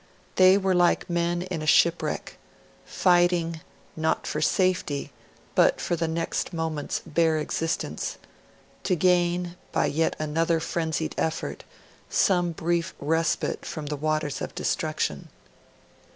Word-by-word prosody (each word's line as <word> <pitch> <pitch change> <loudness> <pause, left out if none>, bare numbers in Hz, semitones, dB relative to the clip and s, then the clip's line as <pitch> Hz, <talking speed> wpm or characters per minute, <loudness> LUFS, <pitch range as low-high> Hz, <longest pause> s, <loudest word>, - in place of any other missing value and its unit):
They 185 +1 +7
were 190 -1 +1
like 175 0 +2
men 175 0 0
in 180 -3 -4
a 155 - -4
shipwreck, 170 +3 +2 0.5
fighting, 175 -2 +2 0.3
not 160 0 0
for 150 - -2
safety, 180 -6 0 0.4
but - - +4
for 175 - -1
the 165 0 -1
next 165 +2 -2
moment's 160 -3 -3
bare 160 0 +2
existence 165 - -2 0.6
to 185 - +1
gain, 175 0 +2 0.2
by - - +1
yet 160 +2 0
another 160 +2 0
frenzied 160 -1 -2
effort, 160 - -2 0.4
some 175 -3 +2
brief 170 +1 -1
respite 160 +2 0
from 155 -2 -6
the 150 0 -3
waters 155 0 -1
of - - -5
destruction. - - -2
165 Hz, 125 wpm, -26 LUFS, 155-175 Hz, 0.6 s, They